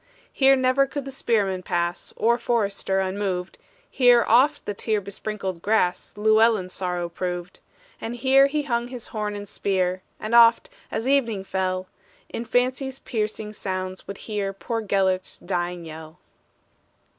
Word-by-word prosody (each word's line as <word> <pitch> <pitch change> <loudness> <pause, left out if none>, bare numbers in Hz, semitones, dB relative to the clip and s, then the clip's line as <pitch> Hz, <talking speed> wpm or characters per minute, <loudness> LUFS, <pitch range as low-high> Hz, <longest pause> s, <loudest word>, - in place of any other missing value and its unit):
Here 270 0 +5
never 260 +1 +3
could 275 +1 -5
the 270 - -6
spearmen 205 -8 0
pass, 175 0 -2
Or 235 +2 +2
forester, 200 -5 0
unmoved, 190 -1 -3 0.3
Here 245 -2 +5
oft 275 +6 +4
the 205 - -2
tear 215 +1 0
besprinkled 200 -2 -5
grass 200 -3 +1
Llewellyn's 215 -3 +3
sorrow 180 -2 -2
proved. 175 0 -5 0.4
And 230 +2 -4
here 265 +3 +5
he 295 +1 -1
hung 240 -3 -1
his 245 -2 -8
horn 210 -1 -3
and 205 0 -7
spear, 185 -2 -1 0.2
And 215 +2 -4
oft, 235 0 +6 0.2
as 225 +3 -3
evening 235 -8 +2
fell, 185 -1 -2 0.4
In 235 - -5
fancy's 255 +2 0
piercing 215 -3 -3
sounds 185 -2 -5
would 200 0 -6
hear 205 -3 -3
Poor 225 +3 -3
Gelert's 190 -2 0
dying 175 -1 -3
yell. 160 +1 -10
210 Hz, 145 wpm, -24 LUFS, 185-240 Hz, 0.4 s, oft